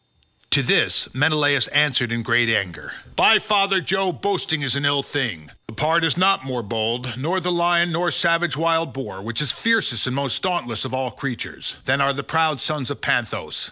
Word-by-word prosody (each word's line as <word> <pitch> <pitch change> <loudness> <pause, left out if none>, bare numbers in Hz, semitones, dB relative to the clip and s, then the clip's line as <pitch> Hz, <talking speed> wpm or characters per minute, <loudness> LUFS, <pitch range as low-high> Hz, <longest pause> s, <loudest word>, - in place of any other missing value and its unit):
To - - +3
this - - +2
Menelaus 145 -2 +2
answered 145 -5 +2
in 115 0 -2
great 120 +1 +2
anger 100 -6 -2 0.2
"By 220 - +6
father 200 -3 +2
Jove, 190 +1 -1
boasting 175 -6 -1
is 135 -2 0
an 140 - -2
ill 140 -1 +2
thing. 105 - -4 0.2
The 110 - -11
pard 160 +6 +1
is 165 0 +1
not 190 -4 +3
more 130 -3 -4
bold, 115 +3 -2
nor 165 +8 -1
the 180 0 -2
lion 175 0 +2
nor 175 +2 0
savage 170 -3 +1
wild 165 0 0
boar, 130 -8 -7
which 115 +7 -2
is 140 - +1
fiercest 220 - 0
and 125 - -2
most 140 -2 -2
dauntless 150 -12 -2
of - - -6
all 130 -1 -2
creatures, 125 0 -6
than 135 +2 +1
are 140 0 +2
the 140 +1 -5
proud 160 -2 0
sons 150 -5 -2
of - - -5
Panthous. - - -2
145 Hz, 190 wpm, -21 LUFS, 125-170 Hz, 0.2 s, By